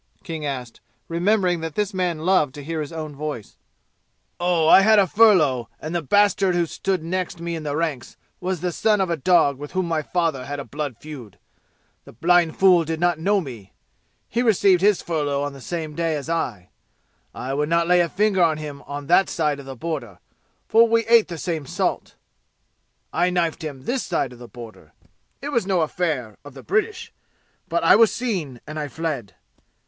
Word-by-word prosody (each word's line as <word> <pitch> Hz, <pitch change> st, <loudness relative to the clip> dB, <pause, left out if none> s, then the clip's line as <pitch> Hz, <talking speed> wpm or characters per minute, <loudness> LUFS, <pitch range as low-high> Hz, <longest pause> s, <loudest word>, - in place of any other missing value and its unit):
King 160 Hz, -5 st, -5 dB
asked, 125 Hz, -4 st, -6 dB, 0.3 s
remembering 180 Hz, +1 st, +1 dB
that 160 Hz, -2 st, -5 dB
this 210 Hz, -1 st, -1 dB
man 175 Hz, -4 st, -2 dB
loved 155 Hz, -7 st, +2 dB
to 145 Hz, -, -8 dB
hear 160 Hz, +1 st, -3 dB
his 150 Hz, -, -6 dB
own 155 Hz, -3 st, -6 dB
voice. 145 Hz, -8 st, -6 dB, 0.8 s
"Oh, 175 Hz, -2 st, +2 dB
I 190 Hz, -, +8 dB
had 215 Hz, +2 st, +5 dB
furlough, 155 Hz, -, +4 dB
and 155 Hz, +2 st, -6 dB
the 175 Hz, -, 0 dB
bastard 200 Hz, +2 st, +3 dB
who 175 Hz, -1 st, +2 dB
stood 185 Hz, +1 st, -2 dB
next 180 Hz, 0 st, -3 dB
me 170 Hz, 0 st, -4 dB
in 160 Hz, -, -5 dB
the 145 Hz, -1 st, -3 dB
ranks 155 Hz, -6 st, -3 dB, 0.2 s
was 180 Hz, -2 st, -3 dB
the 180 Hz, 0 st, -1 dB
son 210 Hz, +4 st, +2 dB
of 190 Hz, -3 st, 0 dB
a -, -, +1 dB
dog 155 Hz, -3 st, +3 dB
with 145 Hz, 0 st, -8 dB
whom 185 Hz, -1 st, 0 dB
my 160 Hz, -2 st, 0 dB
father 160 Hz, -5 st, -1 dB
had 145 Hz, +1 st, -5 dB
a 140 Hz, -, -6 dB
blood 145 Hz, -5 st, -5 dB
feud. 125 Hz, -10 st, -10 dB, 0.7 s
The -, -, -13 dB
blind 170 Hz, +5 st, +2 dB
fool 185 Hz, -3 st, +5 dB
did 160 Hz, 0 st, -4 dB
not 175 Hz, -2 st, +1 dB
know 200 Hz, +4 st, +2 dB
me. 115 Hz, -, -10 dB, 0.5 s
He 235 Hz, -, -1 dB
received 200 Hz, -6 st, +4 dB
his 205 Hz, -1 st, +3 dB
furlough 145 Hz, -4 st, -1 dB
on 145 Hz, -1 st, -4 dB
the 135 Hz, -, -12 dB
same 160 Hz, 0 st, -5 dB
day 165 Hz, 0 st, -1 dB
as 145 Hz, -1 st, -5 dB
I. 115 Hz, -, -3 dB, 0.7 s
I 130 Hz, +2 st, -4 dB
would 150 Hz, +2 st, -1 dB
not 170 Hz, 0 st, +2 dB
lay 175 Hz, -1 st, +4 dB
finger 195 Hz, +2 st, +1 dB
on 160 Hz, -3 st, +3 dB
him 145 Hz, -2 st, -7 dB, 0.2 s
that 175 Hz, +6 st, +3 dB
side 150 Hz, -3 st, -1 dB
of 135 Hz, -, -11 dB
the 135 Hz, -, -7 dB
border, 125 Hz, -, -5 dB, 0.5 s
for 230 Hz, +1 st, +5 dB
we 230 Hz, 0 st, +2 dB
ate 230 Hz, -1 st, +5 dB
the 170 Hz, -, -6 dB
same 160 Hz, -4 st, -3 dB
salt. -, -, -2 dB, 1.0 s
I 175 Hz, +1 st, +2 dB
knifed 170 Hz, -3 st, -1 dB
him 140 Hz, -4 st, -6 dB
this 250 Hz, -, -1 dB
side 140 Hz, -7 st, -1 dB
the 120 Hz, -1 st, -11 dB
border. 115 Hz, -2 st, -12 dB, 0.5 s
It 285 Hz, -, -3 dB
was 235 Hz, -9 st, 0 dB
no 185 Hz, -3 st, +2 dB
affair 150 Hz, -, -2 dB
of 145 Hz, -2 st, -12 dB
the 135 Hz, -, -11 dB
British. 420 Hz, +2 st, -1 dB, 0.5 s
But 170 Hz, -1 st, -1 dB
I -, -, +7 dB
was 225 Hz, 0 st, +5 dB
seen, 180 Hz, -, -3 dB
and 155 Hz, 0 st, -6 dB
I 150 Hz, -, -3 dB
fled. 145 Hz, -8 st, -4 dB
165 Hz, 195 wpm, -22 LUFS, 145-185 Hz, 1.0 s, I